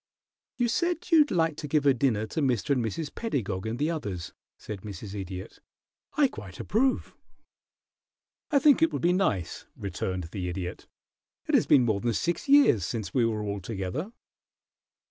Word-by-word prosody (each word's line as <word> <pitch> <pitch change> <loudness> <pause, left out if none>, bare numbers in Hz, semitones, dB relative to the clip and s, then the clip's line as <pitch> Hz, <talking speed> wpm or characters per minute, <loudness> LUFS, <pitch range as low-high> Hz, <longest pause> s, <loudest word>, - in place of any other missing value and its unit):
"You 245 -1 +2
said 345 +8 -1
you'd 305 -3 +6
like 165 -3 +1
to 150 - -5
give 145 0 +1
a 140 - +6
dinner 120 -4 +1
to 155 - -3
Mr. 130 0 +1
and 130 -4 +2
Mrs. 140 +8 -4
Pedagog 110 - -2
and 115 +2 -3
the 150 +5 0
others," 100 - -5 0.2
said 105 -3 -7
Mrs. 100 0 -8
Idiot. 95 0 -7 0.6
"I 295 -2 +5
quite 95 - -10
approve." 255 +5 0 1.3
"I 290 - +3
think 290 +2 +5
it 325 - +4
would - - -4
be 175 +1 +4
nice," 100 - -1
returned 95 -2 -3
the 90 -3 -3
Idiot. 90 0 -5 0.6
"It - - -2
has - - +4
been 130 -3 +6
more 110 -4 +1
than 120 +2 0
six 170 - -2
years 275 - +6
since 110 +3 -4
we 125 -3 +3
were 110 -2 -2
all 100 -1 -3
together." 105 - -4
120 Hz, 170 wpm, -28 LUFS, -, 1.3 s, you'd